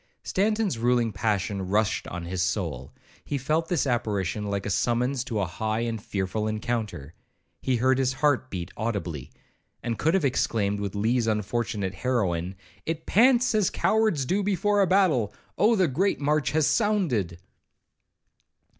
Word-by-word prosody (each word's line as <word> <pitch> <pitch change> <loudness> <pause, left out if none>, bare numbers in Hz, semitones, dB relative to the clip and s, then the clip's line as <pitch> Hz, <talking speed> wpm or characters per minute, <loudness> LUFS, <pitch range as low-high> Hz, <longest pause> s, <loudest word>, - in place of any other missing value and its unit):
Stanton's 210 - 0
ruling 120 -1 +2
passion 100 -2 -1
rushed 105 +2 0
on 85 0 -6
his 90 +1 -3
soul; 85 - -2 0.3
he 145 - -2
felt 155 +5 0
this 170 -5 +1
apparition 105 -5 -1
like 100 -1 -2
a - - -2
summons 125 +5 +1
to 115 -4 -3
a 100 - +1
high 110 +6 -2
and 115 -2 -2
fearful 100 +2 -2
encounter. 110 - -3 0.5
He 130 - +1
heard 130 +2 +2
his 130 -1 +1
heart 130 -2 +1
beat 85 -3 -5
audibly, 95 - -3 0.5
and 115 -2 -3
could 160 +4 +2
have 185 -6 +2
exclaimed 105 -6 0
with 100 -1 -4
Lee's 115 +3 +1
unfortunate 105 -2 -1
heroine,—'It 95 - -3
pants 245 +3 +4
as 210 -4 +3
cowards 190 -6 +1
do 190 +8 +1
before 205 +1 +1
a 195 - +3
battle; 170 - +3 0.2
Oh 220 +4 +4
the 190 -4 +3
great 180 +9 0
march 150 0 +1
has 155 -1 +2
sounded!' 165 - +1
120 Hz, 150 wpm, -26 LUFS, 100-155 Hz, 0.5 s, pants